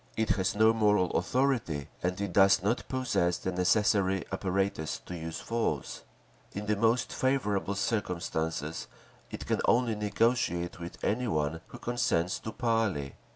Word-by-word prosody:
It 110 Hz, 0 st, 0 dB
has 95 Hz, +1 st, +1 dB
no 110 Hz, +1 st, +5 dB
moral 105 Hz, -5 st, +3 dB
authority 110 Hz, -, 0 dB
and 90 Hz, +1 st, -1 dB
it 100 Hz, -3 st, -3 dB
does 95 Hz, -1 st, +5 dB
not 110 Hz, +5 st, 0 dB
possess 120 Hz, -10 st, 0 dB
the 95 Hz, -, -3 dB
necessary 95 Hz, +1 st, +2 dB
apparatus 95 Hz, -4 st, -1 dB
to 90 Hz, -, -6 dB
use 80 Hz, -1 st, -5 dB
force…. 115 Hz, 0 st, -2 dB, 0.5 s
In 105 Hz, +1 st, -4 dB
the 105 Hz, 0 st, +1 dB
most 115 Hz, +3 st, +1 dB
favourable 105 Hz, -7 st, 0 dB
circumstances 85 Hz, -7 st, -2 dB, 0.4 s
it -, -, -7 dB
can -, -, 0 dB
only 120 Hz, -1 st, +3 dB
negotiate 105 Hz, -5 st, 0 dB
with 85 Hz, 0 st, -7 dB
any 125 Hz, +4 st, 0 dB
one 80 Hz, -3 st, -1 dB
who -, -, -10 dB
consents 120 Hz, -8 st, 0 dB
to 110 Hz, -, -6 dB
parley. 110 Hz, -, 0 dB
100 Hz, 145 wpm, -30 LUFS, 90-115 Hz, 0.5 s, no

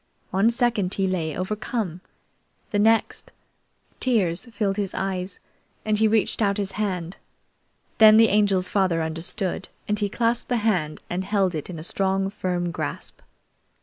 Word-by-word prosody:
One 195 Hz, +4 st, +3 dB
second 230 Hz, -6 st, +1 dB
he 195 Hz, -, 0 dB
lay 170 Hz, -5 st, -2 dB
overcome; 205 Hz, -2 st, -3 dB, 0.7 s
the 205 Hz, -, +1 dB
next, 225 Hz, +2 st, +2 dB, 0.7 s
tears 200 Hz, -6 st, 0 dB
filled 210 Hz, -4 st, -2 dB
his 200 Hz, -3 st, -2 dB
eyes, 190 Hz, -1 st, -3 dB, 0.5 s
and 215 Hz, -1 st, +2 dB
he 220 Hz, -, +4 dB
reached 220 Hz, +1 st, +1 dB
out 200 Hz, -2 st, +2 dB
his 200 Hz, -2 st, -2 dB
hand. 185 Hz, -4 st, -3 dB, 0.8 s
Then 215 Hz, -1 st, +9 dB
the 225 Hz, -1 st, +6 dB
Angel's 200 Hz, -3 st, +3 dB
father 185 Hz, -5 st, +1 dB
understood, 165 Hz, +4 st, -3 dB, 0.2 s
and 210 Hz, 0 st, 0 dB
he 205 Hz, -1 st, 0 dB
clasped 235 Hz, +3 st, 0 dB
that 245 Hz, -, +1 dB
hand 185 Hz, -9 st, 0 dB
and 180 Hz, +2 st, -2 dB
held 195 Hz, -2 st, +1 dB
it 155 Hz, +1 st, -5 dB
in 175 Hz, -, -6 dB
a 155 Hz, -, -7 dB
strong, 195 Hz, +2 st, 0 dB
firm 180 Hz, -3 st, -2 dB
grasp. 70 Hz, -, -5 dB
195 Hz, 150 wpm, -24 LUFS, 180-215 Hz, 0.8 s, Then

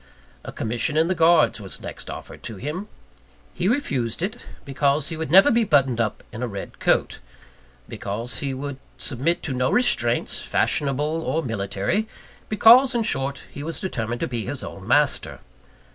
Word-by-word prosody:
A -, -, -7 dB
commission 120 Hz, +7 st, -1 dB
in 160 Hz, +2 st, +3 dB
the -, -, +3 dB
Guards 165 Hz, -10 st, +4 dB
was 95 Hz, -, -4 dB
next -, -, -8 dB
offered -, -, -9 dB
to 115 Hz, -3 st, -6 dB
him. 150 Hz, -, -5 dB, 0.7 s
He 180 Hz, -, -1 dB
refused 140 Hz, -, 0 dB
it, 215 Hz, +6 st, -4 dB, 0.2 s
because 140 Hz, +1 st, +1 dB
he 160 Hz, -, -4 dB
would 160 Hz, 0 st, -4 dB
never 190 Hz, +5 st, +7 dB
be 235 Hz, 0 st, +3 dB
buttoned 135 Hz, -, +3 dB
up 110 Hz, -2 st, -2 dB
in 115 Hz, -, -7 dB
a 125 Hz, -, -1 dB
red 100 Hz, -3 st, -8 dB
coat; -, -, +1 dB, 0.7 s
because 115 Hz, +5 st, -4 dB
he 140 Hz, -2 st, -2 dB
would 135 Hz, +1 st, -5 dB, 0.2 s
submit 150 Hz, +7 st, -1 dB
to 140 Hz, -, -2 dB
no 130 Hz, 0 st, +1 dB
restraints, 120 Hz, -, +1 dB
fashionable 150 Hz, +3 st, 0 dB
or 160 Hz, 0 st, -1 dB
military; 115 Hz, -, -1 dB, 0.4 s
because 240 Hz, +5 st, +6 dB
in 235 Hz, -, +2 dB
short, 140 Hz, -7 st, -2 dB
he 140 Hz, -, -8 dB
was 160 Hz, +3 st, -1 dB
determined 120 Hz, -, -3 dB
to -, -, 0 dB
be 120 Hz, -3 st, -3 dB
his 135 Hz, +4 st, -4 dB
own 95 Hz, +1 st, -9 dB
master. 145 Hz, +3 st, +2 dB
140 Hz, 170 wpm, -23 LUFS, 120-170 Hz, 0.7 s, never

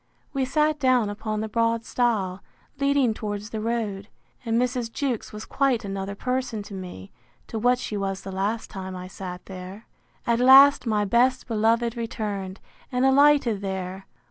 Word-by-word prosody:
We 270 Hz, -2 st, 0 dB
sat 300 Hz, +3 st, +1 dB
down 255 Hz, -6 st, +3 dB
upon 215 Hz, +1 st, -3 dB
the 220 Hz, -, -2 dB
broad 230 Hz, +1 st, 0 dB
stile, 205 Hz, -8 st, 0 dB, 0.4 s
leading 280 Hz, -4 st, +2 dB
towards 210 Hz, 0 st, -5 dB
the 220 Hz, -, -3 dB
road; 215 Hz, -3 st, -2 dB, 0.4 s
and 230 Hz, -1 st, +1 dB
Mrs. 250 Hz, -2 st, -1 dB
Jewkes 255 Hz, -3 st, -2 dB
was 210 Hz, +1 st, -8 dB
quite 260 Hz, -5 st, +1 dB
another 195 Hz, 0 st, -4 dB
person 250 Hz, -2 st, -2 dB
to 200 Hz, -, -11 dB
me, 180 Hz, -, -8 dB, 0.3 s
to 225 Hz, -, -5 dB
what 245 Hz, +2 st, +3 dB
she 225 Hz, -, -5 dB
was 195 Hz, -1 st, -2 dB
the 195 Hz, -, -6 dB
last 200 Hz, +4 st, -2 dB
time 190 Hz, -2 st, -6 dB
I 180 Hz, 0 st, -7 dB
sat 185 Hz, -1 st, -8 dB
there. 190 Hz, +3 st, -9 dB, 0.4 s
At 235 Hz, 0 st, +2 dB
last 270 Hz, +1 st, +7 dB
my 210 Hz, -2 st, +1 dB
best 245 Hz, +5 st, +2 dB
beloved 230 Hz, +1 st, +1 dB
returned, 205 Hz, -4 st, -4 dB, 0.3 s
and 250 Hz, +1 st, +1 dB
alighted 270 Hz, -6 st, +4 dB
there. 190 Hz, -1 st, -5 dB
220 Hz, 165 wpm, -25 LUFS, 195-250 Hz, 0.4 s, last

